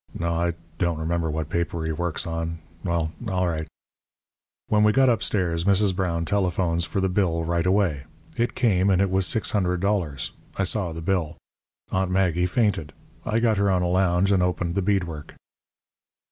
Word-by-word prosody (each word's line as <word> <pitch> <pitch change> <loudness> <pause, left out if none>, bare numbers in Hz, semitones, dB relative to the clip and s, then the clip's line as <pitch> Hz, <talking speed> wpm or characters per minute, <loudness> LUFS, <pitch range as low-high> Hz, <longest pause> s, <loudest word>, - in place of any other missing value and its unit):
No, 85 0 -1
I 85 0 0 0.2
don't 85 -3 +1
remember 80 +1 -1
what 80 0 -2
paper 85 -1 -2
he 80 - -1
works 85 +3 -2
on. 85 0 -3 0.3
Well, 85 -3 -1 0.2
all 90 -3 0
right. 80 -2 -2 1.0
"When 105 0 +3
we 105 - +5
got 130 +2 +5
upstairs 90 -7 0
Mrs. 100 -1 +3
Brown 85 -3 -1
telephones 90 -4 +1
for 85 - -2
the 95 - +2
bill 90 -3 +1
right 85 +1 0
away. 90 -8 +1 0.3
It 120 +1 -1
came, 100 -6 +2
and 95 -2 +3
it 100 -1 +2
was 95 0 +2
$600. 95 - 0 0.3
I 100 - +1
saw 95 -2 0
the 80 +1 -6
bill. 85 -2 -1 0.5
Aunt 95 0 0
Maggie 90 -2 +2
fainted. 100 -6 0 0.3
I 110 - +1
got 115 -3 +2
her 100 0 +2
on 90 -2 +2
a - - +1
lounge 90 +1 +2
and 95 -2 +3
opened 90 -1 0
the 100 - 0
bead 95 0 +2
work. 80 -4 -8
90 Hz, 175 wpm, -24 LUFS, 85-100 Hz, 1.0 s, we